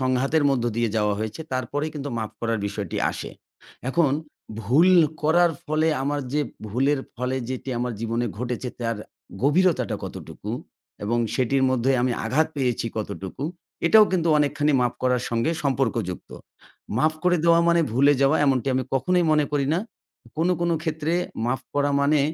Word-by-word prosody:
সংঘাতের 130 +4 +1
মধ্য 130 -3 0
দিয়ে 120 0 +1
যাওয়া 105 -1 +2
হয়েছে, 110 +8 -4
তারপরেই 145 +5 -2
কিন্তু 145 -1 -4
মাফ 110 -1 -3
করার 115 -2 0
বিষয়টি 100 -3 -4
আসে। - - -6 0.6
এখন 150 0 +2 0.5
ভুল 140 - +4 0.3
করার 170 +3 +4
ফলে 155 +1 +1 0.2
আমার 145 +1 -1
যে 150 - +2 0.3
ভুলের 135 +6 +1 0.2
ফলে 125 +2 -2
যেটি 130 +1 -5
আমার 125 0 -2
জীবনে 115 +1 -1
ঘটেছে 125 +1 -3
তার 115 -1 -1 0.5
গভীরতাটা 170 +5 +2
কতটুকু - - -8 0.5
এবং 120 +3 0 0.2
সেটির 130 +1 +1
মধ্যে 130 +1 +1
আমি 125 0 +1
আঘাত 150 +8 +2
পেয়েছি 125 -4 0
কতটুকু, 100 +3 -5 0.4
এটাও 215 +5 +8
কিন্তু 170 -3 +1
অনেকখানি 145 +1 +1
মাফ 125 -1 +1
করার 125 -1 +2
সঙ্গে 115 +6 0
সম্পর্কযুক্ত। 115 -9 -1 0.7
মাফ 155 +5 +3
করে 180 0 +3
দেওয়া 170 0 +5
মানে 170 0 +4
ভুলে 140 +4 +5
যাওয়া 140 +3 +4
এমনটি 135 -2 +2
আমি 130 - +1
কখনোই 180 +6 +2
মনে 150 -1 +3
করি 140 -2 +1
না। - - +2 0.6
কোনো, 170 +3 +2
কোনো 170 -1 +1
ক্ষেত্রে 160 -1 -2 0.3
মাফ 125 +1 0
করা 145 0 +2
মানে 145 +1 +3
135 Hz, 155 wpm, -24 LUFS, 120-155 Hz, 0.7 s, এটাও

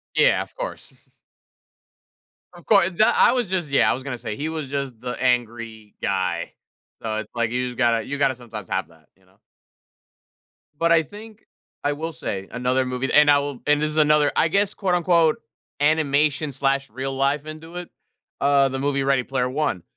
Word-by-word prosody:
Yeah. - - +4
Of - - -13
course. - - -8 1.4
Of 175 -1 -16
course, 195 -5 +5
and 175 - -12
tha 215 - +6
I - - +6
was 245 -5 0
just 180 -5 -2
yeah. 140 - +4
I - - +4
was 130 - -6
gonna 130 -3 -5
say, 105 - -5
he 150 +6 -3
was 155 -4 -4
just 140 -4 -4
the 125 0 -5
angry 115 -3 -1
guy. 90 -3 -1 0.5
So, 110 -1 -2
it's 110 -1 -5
like 115 -1 0
you 125 +1 -1
just 125 - -9
gotta 115 -3 +2
you 140 +4 -4
gotta 135 -2 +2
sometimes 115 -5 -9
have 95 -4 -2
that, 80 -2 -23
you 95 - -30
know? 95 +2 -29 1.4
But 170 0 +3
I 165 -1 +5
think 210 +6 -13 0.4
I 145 - +2
will 160 +3 -4
say 95 -11 -5
another 125 +1 0
movie 125 +1 -2
and 150 0 +6
I 145 - +6
will 140 -2 -4
and 150 0 +3
this 150 0 0
is 155 - -5
another, 150 -1 +4
I 165 - +4
guess, 200 +4 +1
quote 190 -3 0
unquote, 170 -3 +3 0.4
"Animation 150 -1 +2
slash 135 0 0
real 135 +3 -4
life 140 +2 0
into 160 +2 -9
it." 180 -1 -7 0.5
Uh, 140 -1 +4
the 135 - -4
movie, 140 0 0
Ready 135 -1 +2
Player 125 0 -1
One. 135 - -1
140 Hz, 195 wpm, -23 LUFS, 125-155 Hz, 1.4 s, tha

